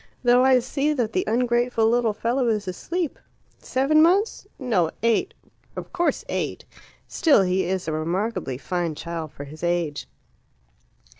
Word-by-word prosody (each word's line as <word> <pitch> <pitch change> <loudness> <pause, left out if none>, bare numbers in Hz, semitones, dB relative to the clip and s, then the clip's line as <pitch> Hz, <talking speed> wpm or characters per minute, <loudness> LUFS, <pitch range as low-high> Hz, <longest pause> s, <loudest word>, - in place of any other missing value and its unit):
Though 245 +1 +5
I 260 -1 +6
see 275 +4 0
that 235 -6 -1
the - - +1
ungrateful 240 0 +2
little 235 -1 +2
fellow 240 +3 0
is 210 -3 0
asleep! 330 - -3 0.4
Seven 275 +4 +2
months? 390 +6 +2
No, 210 - +1
eight; 230 -1 +1 0.4
of - - -8
course 345 -1 0
eight. - - -3 0.4
Still, 290 - +4
he 185 0 +1
is 185 0 -2
a - - -1
remarkably 165 - -2
fine 170 +2 -2
child 165 -1 -5
for 145 - -9
his 155 +3 -11
age." 170 -4 -1
225 Hz, 145 wpm, -24 LUFS, 175-255 Hz, 0.4 s, I